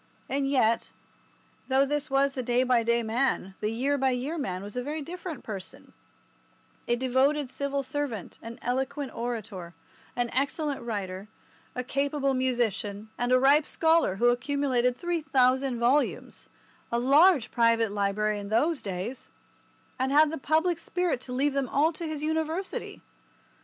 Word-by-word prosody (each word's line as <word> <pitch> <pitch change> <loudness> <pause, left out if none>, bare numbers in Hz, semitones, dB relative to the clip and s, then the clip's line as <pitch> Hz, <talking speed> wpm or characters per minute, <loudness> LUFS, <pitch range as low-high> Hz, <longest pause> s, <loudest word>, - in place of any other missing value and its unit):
And 275 0 0
yet, 230 -5 +2 0.8
though 265 +1 +3
this 295 +1 -2
was 275 0 +2
the 260 - -3
day 245 +1 +2
by 250 -2 +3
day 235 +1 +1
man, 225 -4 0
the 210 - -1
year 270 +6 0
by 265 0 +3
year 260 +5 -2
man 195 - -3
was 205 +2 -9
a 250 - -1
very 295 +4 -4
different 350 -2 -7
person, 195 -4 -8 0.9
a 240 - +2
devoted 260 +2 +1
civil 280 0 -2
servant, 260 -7 -4
an 230 +1 -8
eloquent 265 +2 -2
orator, 215 -7 -5 0.4
an 245 -1 -1
excellent 280 +2 -1
writer, 200 -4 -4 0.5
a 250 - -2
capable 275 +1 0
musician, 220 -5 -1
and 245 +1 -1
a 255 - +6
ripe 280 +4 +4
scholar 320 - +2
who 240 +5 +3
accumulated 250 -1 +1
3000 270 -7 +1
volumes—a 240 -1 -2
large 275 +1 +5
private 230 -2 +3
library 205 +1 0
in 200 0 -7
those 290 +8 +1
days—and 230 +5 -7
had 300 +1 +5
the 320 - -4
public 320 +4 +1
spirit 360 -8 -1
to 255 - -9
leave 275 +3 +1
them 275 -2 -1
all 310 +4 +2
to 335 +1 -5
his 305 -1 -4
University. 320 +4 -3
260 Hz, 145 wpm, -28 LUFS, 235-290 Hz, 0.9 s, a